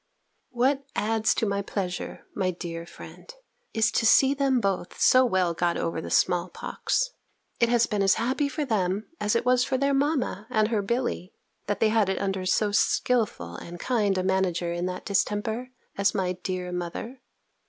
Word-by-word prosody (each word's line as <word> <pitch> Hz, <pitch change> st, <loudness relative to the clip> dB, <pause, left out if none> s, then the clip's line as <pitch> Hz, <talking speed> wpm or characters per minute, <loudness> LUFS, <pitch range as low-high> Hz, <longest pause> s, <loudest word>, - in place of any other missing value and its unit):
What 265 Hz, +3 st, +1 dB
adds 220 Hz, +1 st, +1 dB
to -, -, 0 dB
my 200 Hz, -1 st, 0 dB
pleasure, 190 Hz, -3 st, -4 dB
my 190 Hz, -2 st, 0 dB
dear 170 Hz, -1 st, -6 dB
friend, 485 Hz, -, -12 dB, 0.4 s
is 220 Hz, -1 st, +2 dB
to 230 Hz, -, +1 dB
see 270 Hz, +3 st, +6 dB
them 275 Hz, -2 st, +2 dB
both 195 Hz, -5 st, -2 dB
so 255 Hz, 0 st, +6 dB
well 185 Hz, -7 st, +1 dB
got 170 Hz, +1 st, 0 dB
over 165 Hz, -1 st, -2 dB
the -, -, -7 dB
small 180 Hz, 0 st, +2 dB
pox. -, -, -2 dB, 0.5 s
It 235 Hz, -, +3 dB
has 235 Hz, -1 st, +4 dB
been 210 Hz, -3 st, -1 dB
as 195 Hz, -1 st, +4 dB
happy 265 Hz, +5 st, 0 dB
for 300 Hz, +1 st, -2 dB
them, 205 Hz, -3 st, 0 dB
as 210 Hz, +2 st, +1 dB
it 230 Hz, -, +1 dB
was 250 Hz, 0 st, +4 dB
for 260 Hz, 0 st, 0 dB
their 280 Hz, +1 st, +1 dB
mamma 275 Hz, -7 st, 0 dB
and 215 Hz, -3 st, +2 dB
her 220 Hz, -3 st, +1 dB
Billy, 235 Hz, -3 st, -2 dB, 0.3 s
that 205 Hz, -, -1 dB
they 220 Hz, -, +4 dB
had 215 Hz, -3 st, +2 dB
it 190 Hz, -, -1 dB
under 190 Hz, -1 st, -2 dB
so 205 Hz, +2 st, +2 dB
skilful 210 Hz, -, +1 dB
and 175 Hz, 0 st, -9 dB
kind 210 Hz, -5 st, +1 dB
a 185 Hz, -, 0 dB
manager 185 Hz, -2 st, 0 dB
in 175 Hz, +1 st, -2 dB
that 180 Hz, 0 st, -5 dB
distemper, 220 Hz, +5 st, -1 dB, 0.3 s
as 200 Hz, +2 st, +2 dB
my 185 Hz, -2 st, 0 dB
dear 180 Hz, 0 st, -4 dB
mother. 180 Hz, +9 st, -5 dB
205 Hz, 185 wpm, -26 LUFS, 185-245 Hz, 0.5 s, see